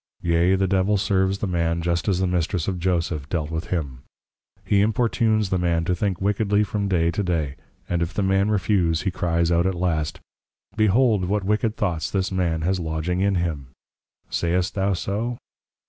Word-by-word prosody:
_ - - -5
Yea, 85 +3 +3
the 95 0 +1
Devil 95 +2 +2
serves 95 0 +1
the 100 - -3
man 85 -2 0
just 85 +2 -1
as 95 -3 +2
the 95 - +1
Mistress 90 -1 -1
of 95 -2 -2
Joseph 85 -5 -1
dealt 80 -3 -2
with 80 +2 -3
him; 70 -8 -3 0.6
he 100 -1 +3
importunes 110 -1 +1
the 95 - +1
man 85 -2 +1
to 90 - +1
think 95 -1 -1
wickedly 105 +1 +1
from 105 -1 -2
Day 85 -3 +2
to 95 - -2
Day; 80 -7 -1 0.3
and 85 -1 -1
if 85 +1 -1
the 100 - -1
man 95 +1 +2
refuse, 90 -5 +1
he 95 - 0
cries 85 -1 0
out 85 +2 +3
at 95 - -1
last, 80 -4 -1 0.6
Behold, 110 -1 +3
what 100 +2 0
wicked 105 +2 0
thoughts 90 -8 -1
this 95 0 -1
man 85 -4 0
has 90 +3 0
lodging 80 +2 -2
in 100 0 +2
him. 80 -6 -2 0.6
Sayst 90 +2 0
thou 100 0 +1
so? 110 +6 -2
90 Hz, 190 wpm, -23 LUFS, 85-100 Hz, 0.6 s, Yea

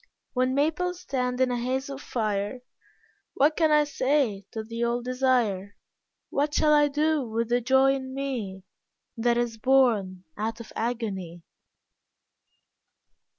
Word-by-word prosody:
When 255 +1 +1
maples 345 +5 0
stand 250 -2 -2
in 255 -1 +3
a 245 - -1
haze 260 +3 -2
of 275 0 -7
fire 210 +1 -2 0.7
What 295 +3 +3
can 320 -2 +3
I 300 0 +5
say 260 -8 0
to 220 - -5
the 230 +2 -4
old 240 +1 -1
desire, 245 -6 0 0.6
What 290 +1 0
shall 300 -1 +4
I 295 -1 +5
do 300 +1 +1
with 230 +1 -1
the 245 +1 +2
joy 265 +2 +4
in 260 -1 -4
me 230 -9 -4 0.5
That 235 0 +1
is 235 -2 -1
born 215 -8 +2
out 220 +2 -3
of 230 - -10
agony? 200 -8 -3
250 Hz, 140 wpm, -26 LUFS, 225-275 Hz, 0.7 s, I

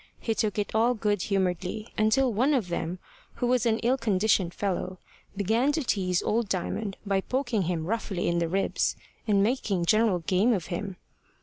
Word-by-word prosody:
He 225 - -1
took 215 -2 -1
it 205 - -2
all 230 +3 +3
good 210 -3 0
humouredly, 195 +2 -2
until 230 +4 +2
one 260 +8 +3
of 220 -9 -1
them, 170 +1 -3 0.4
who - - -2
was 245 -1 +2
an 220 -1 +2
ill 250 +3 +3
conditioned 200 -4 +2
fellow, 185 -1 -3 0.4
began 225 +8 +2
to 315 - 0
tease 185 -6 0
old 225 -1 0
Diamond 195 +2 -2
by 195 -1 +1
poking 250 -2 -1
him 165 -3 -1
roughly 200 -2 -2
in 170 0 +1
the 170 -1 0
ribs, 195 +3 0 0.3
and 200 -2 +4
making 205 -6 0
general 215 0 +3
game 185 +7 +2
of 185 -7 -2
him. 195 +2 -4
205 Hz, 180 wpm, -27 LUFS, 185-230 Hz, 0.4 s, and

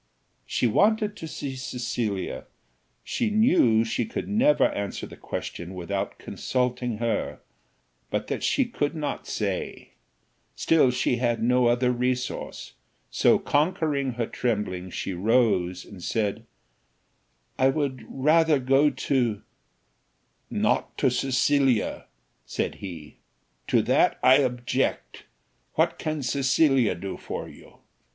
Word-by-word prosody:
She - - 0
wanted 210 - +2
to 160 - -7
see 140 -3 -5
Cecilia, 120 -6 -3 0.6
she 235 - -1
knew 180 - +4
she 115 - -1
could 230 - -5
never 255 +9 +4
answer 100 -1 -4
the - - -11
question 85 +2 -6
without 95 +3 -3
consulting 125 -2 -2
her, 115 0 -2 0.7
but - - -2
that - - -3
she 270 - +2
could 165 -10 -2
not 150 -2 -4
say; 100 -4 -3 0.6
still 160 -5 +3
she 125 0 0
had 120 -2 0
no 125 +1 +3
other 125 +1 +2
resource, 125 +1 -3 0.4
so, - - +4
conquering 145 -3 0
her 115 0 -2
trembling, 100 -7 -2
she 95 - -4
rose 95 -3 +1
and 95 -4 -12
said, 105 +1 -2 1.1
"I 130 +1 +5
would 135 -2 -2
rather 155 +3 +3
go 135 +3 +3
to 120 -8 -1 0.5
" - - -45 0.2
"Not - - 0
to 130 - +2
Cecilia," 135 -1 +1 0.4
said - - -2
he; 85 -6 -8 0.5
"to - - +3
that - - +3
I 130 +1 +7
object: 125 -1 -1 0.5
what - - +1
can 155 -2 -3
Cecilia 135 - +2
do 95 +3 -6
for - - -6
you? - - -15
125 Hz, 120 wpm, -26 LUFS, 110-145 Hz, 1.1 s, I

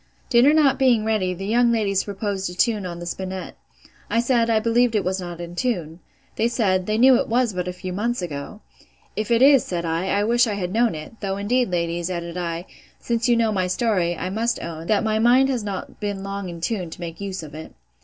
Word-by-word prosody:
Dinner 250 +4 +6
not 285 -4 +3
being 245 -5 +3
ready, 215 -4 +1
the 195 +2 -6
young 235 +3 +3
ladies 200 -4 +1
proposed 200 -2 -3
a 180 - -8
tune 210 0 +1
upon 170 -1 -6
the 175 - -7
spinnet. 185 +1 -5 0.5
I 230 - +2
said, 235 -1 +2
I 225 -1 +3
believed 230 +1 +2
it 205 - +2
was 185 +1 -1
not 175 -1 -7
in 175 0 -7
tune. 175 -8 -2 0.4
They 225 - +2
said, 190 -6 0
they 215 0 0
knew 255 +1 +6
it - - -4
was 235 -1 +1
but 180 0 -3
a - - -1
few 180 0 -6
months 235 +5 -1
ago. 170 +4 -6 0.5
If 215 +1 -3
it 235 +1 +4
is, 275 -3 +7
said 170 -2 -3
I, 165 +3 -1
I 200 +1 +1
wish 240 +3 +3
I 210 - -1
had 185 -2 -3
known 230 -3 +2
it; 155 +9 -9
though 195 -1 -2
indeed, 240 +4 +1
ladies, 170 0 -1
added 170 -1 -4
I, 170 -1 -3 0.3
since 235 0 -1
you 240 - +4
know 225 -1 +2
my 185 -3 0
story, 180 -4 0
I 185 - -4
must 230 +4 -1
own, 165 0 -6
that 215 -1 +2
my 220 -1 +1
mind 250 +4 +5
has 250 -5 -1
not 200 -3 -6
been 205 -2 -3
long 195 -1 -5
in 170 -1 -8
tune, 180 -2 -2
to 160 - -10
make 170 +1 -7
use 190 -3 -4
of 150 -2 -10
it. 155 +1 -9
200 Hz, 235 wpm, -23 LUFS, 180-230 Hz, 0.5 s, is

